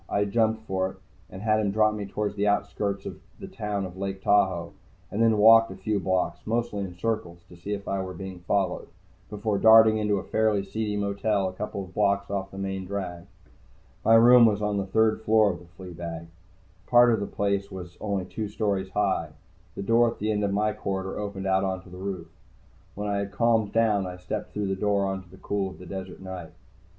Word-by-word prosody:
I 100 0 +1
jumped 110 +1 +1
for 95 -2 -1
it 95 - -13 0.3
and 95 +2 -9
had 110 -1 +3
him 105 -2 +1
drop 110 +1 +3
me 105 -2 -5
toward 105 +1 -3
the 105 0 0
outskirts 100 -1 -1
of - - -7 0.2
the - - -7
town 105 -3 -3
of 90 -1 -9
Lake 95 0 -4
Tahoe, 95 -4 +2 0.4
and 105 - -1
then 115 -1 +4
walked 115 +2 +7
a 95 - -8
few 100 +2 -1
blocks, 95 0 0
mostly 115 -2 -1
in 90 -2 -7
circles 90 -5 -3
to 90 - -13
see 95 +4 -5
if 100 -1 -6
I 95 0 -1
were 95 -1 -6
being 95 0 -7
followed, 90 +1 -1 0.4
before 105 -1 -2
darting 110 0 +7
into 105 -1 +1
a - - -4
fairly 110 -2 +1
seedy 105 0 -3
motel 100 0 0
a - - -10
couple 100 0 -5
blocks 100 +2 0
off 95 -1 -2
the 95 - -11
main 95 -1 -3
drag. 90 -3 -5 0.8
My 115 - +6
room 120 +1 +8
was 105 -2 +1
on 105 -1 -1
the 100 -1 -2
third 110 +2 +2
floor 110 -2 +4
of 85 - -7
the 90 - -15
flea 90 +1 -11
bag. 85 -1 -6 0.6
Part 120 -1 +6
of 110 - +1
the 100 - -3
place 100 -1 -1
was 90 -3 -9
only 100 -3 -2
two 110 +3 -4
stories 100 -3 -1
high. 95 -5 0 0.5
The 100 - -4
door 115 +3 +4
at 115 - -7
the 110 +1 -1
end 105 -1 0
of 100 - 0
my 105 +2 +1
corridor 95 -1 -4
opened 100 -2 -5
out 95 0 +2
onto 95 -1 -4
the 90 - -9
roof. 95 -3 -5 0.7
When 105 +1 -4
I 100 -1 0
had 100 0 -4
calmed 110 -1 +2
down, 105 -4 +2
I 90 0 -7
stepped 90 +4 -5
through 105 -1 -2
the 95 - 0
door 100 0 +1
into 95 -2 -8
the 95 - -15
cool 100 0 -2
of 95 - -12
the 90 - -11
desert 95 +1 -7
night. 95 -3 -7
100 Hz, 220 wpm, -26 LUFS, 95-105 Hz, 0.8 s, room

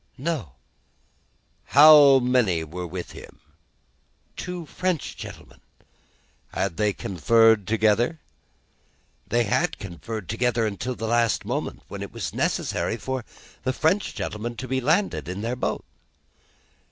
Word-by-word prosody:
"No." 135 - -3 1.2
"How 145 -2 +9
many 125 -10 +2
were 90 +3 -6
with 90 +1 -6
him?" - - -12 1.0
"Two 180 -2 -6
French 180 +1 -2
gentlemen." - - -11 0.9
"Had 95 -4 -2
they 105 -1 +2
conferred 110 +3 +3
together?" 115 +8 +2 1.1
"They 120 0 +2
had 105 - 0
conferred 100 +2 -7
together 120 +1 0
until 110 +5 -3
the 115 - -5
last 115 -1 +1
moment, - - -4
when - - -7
it - - -6
was - - -5
necessary 110 - -1
for 130 0 -4 0.4
the 130 +1 -1
French 180 +8 0
gentlemen 115 +3 -4
to 130 +2 -6
be 130 +1 -1
landed 160 - +1
in 95 +3 -4
their 115 +3 -2
boat." 125 - -3
120 Hz, 125 wpm, -24 LUFS, 105-130 Hz, 1.2 s, How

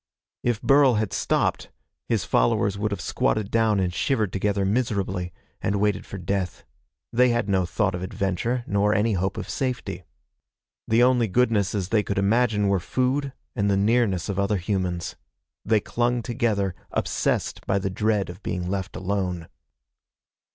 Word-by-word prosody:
If 120 -3 -1
Burl 135 -3 +5
had 105 -2 -1
stopped, - - 0 0.4
his - - +1
followers 95 +11 +2
would 105 +1 -1
have 100 - -3
squatted 105 -2 0
down 110 -3 +3
and 90 -2 0
shivered 110 -3 0
together 100 0 0
miserably, 100 -5 -1 0.3
and 100 +1 0
waited 105 0 0
for 100 - -6
death. 95 0 -3 0.5
They 125 +2 +5
had 120 -3 0
no 95 -3 +1
thought 95 +2 0
of 90 - -4
adventure 100 +6 -1
nor 100 +1 +2
any 110 +2 +2
hope 95 +1 -1
of - - -4
safety. 130 -2 -3 0.9
The 115 +2 +4
only 125 -2 +4
goodnesses 105 -4 +1
they 110 -1 +3
could 100 -1 -3
imagine 105 +1 +2
were 100 -1 +2
food 130 - 0 0.2
and 100 -4 +1
the 100 - +3
nearness 105 -3 +2
of 100 -1 -2
other 100 +1 +1
humans. 90 -2 -2 0.5
They 110 -1 +3
clung 120 +3 0
together, 110 -6 0 0.2
obsessed - - -1
by 95 - +2
the 95 -1 -2
dread 105 -1 0
of 90 +3 -13
being 90 -2 -3
left 95 -2 -3
alone. 90 -3 -2
100 Hz, 160 wpm, -25 LUFS, 95-115 Hz, 0.9 s, Burl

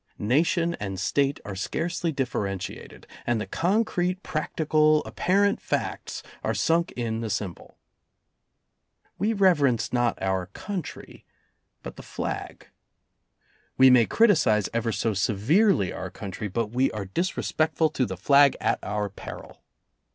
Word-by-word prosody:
Nation 165 - +1
and 95 -3 -4
State 140 +8 +1
are 100 - -6
scarcely 170 - -2
differentiated, 105 - -4 0.2
and 120 -2 +1
the 110 - -3
concrete, 185 -1 0
prac 155 - -4
tical, 155 -1 +3
apparent 200 +2 +1
facts - - -3 0.2
are - - -1
sunk 165 +1 +1
in 115 -2 -3
the 115 - -3
symbol. 100 -3 -5 1.4
We 210 +3 +1
reverence 150 - +2
not 120 -2 +1
our 95 -2 -1
country 185 - -7 0.6
but - - -8
the - - -8
flag. - - -6 1.1
We 130 0 +7
may 120 -3 +5
criticize 160 - +3
ever 115 0 0
so 110 +2 -1
severely 110 - +2
our 95 - -5
country, 100 +2 -6
but 105 +2 -2
we 130 +3 +2
are 105 -2 -4
.disrespectful 160 - 0
to 130 - 0
the 95 -2 -6
flag 140 +7 +5
at - - 0
our 105 0 -2
peril. 100 - -10
125 Hz, 130 wpm, -26 LUFS, 105-165 Hz, 1.4 s, We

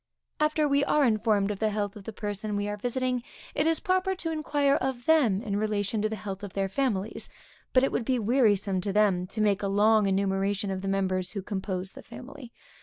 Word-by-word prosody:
After 305 0 +2
we 280 0 +3
are 295 0 +3
informed 215 -3 +2
of 200 - -5
the 220 - +2
health 205 -1 -2
of 205 -2 -11
the - - -5
person 210 0 -4
we 205 0 -1
are 205 - -2
visiting, 250 +3 -1 0.3
it 295 +2 +1
is 325 0 +2
proper 375 -1 +1
to 330 -3 -3
inquire 290 -3 +1
of 255 -2 -3
them 245 -11 +3
in 200 -2 -2
relation 210 0 -1
to 215 - +1
the 220 - -3
health 195 -1 -6
of 200 -2 -7
their 195 -1 0
families; 210 -1 -2 0.4
but 255 - +4
it 270 - +2
would 235 - -1
be 255 0 +1
wearisome 205 -5 +2
to 200 - -2
them, 195 -4 +2
to 215 +3 -4
make 205 -2 +2
a 200 - -1
long 210 +1 +4
enumeration 195 +1 0
of 190 -1 -3
the 195 - -4
members 185 -1 0
who 200 -3 -4
compose 190 -2 -4
the - - -11
family. 250 +2 -11
210 Hz, 220 wpm, -28 LUFS, 195-255 Hz, 0.4 s, but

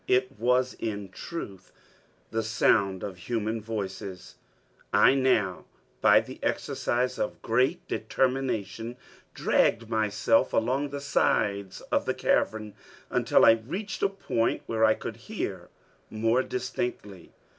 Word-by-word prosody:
It 130 0 +2
was 125 +2 +2
in 100 -3 -4
truth 95 - -8 0.6
the 115 - 0
sound 100 -3 +2
of 95 -3 -5
human 110 +2 -2
voices. 100 -4 -6 0.6
I - - +6
now 125 -9 +1 0.4
by - - +6
the - - -10
exercise 125 +1 -1
of 105 - -2
great 125 +4 +1
determination 125 -3 -1 0.4
dragged 115 0 +2
myself 110 -2 +2
along 135 +5 +1
the 140 0 -5
sides 100 -8 0
of - - +2
the - - 0
cavern, 110 -1 0 0.4
until - - +4
I - - +9
reached 195 - -5
a 195 - +3
point 120 -12 -1
where 110 -1 -1
I 110 0 +5
could - - -6
hear - - -5 0.4
more 115 +3 +2
distinctly. 120 -7 -4
115 Hz, 125 wpm, -27 LUFS, 105-125 Hz, 0.6 s, I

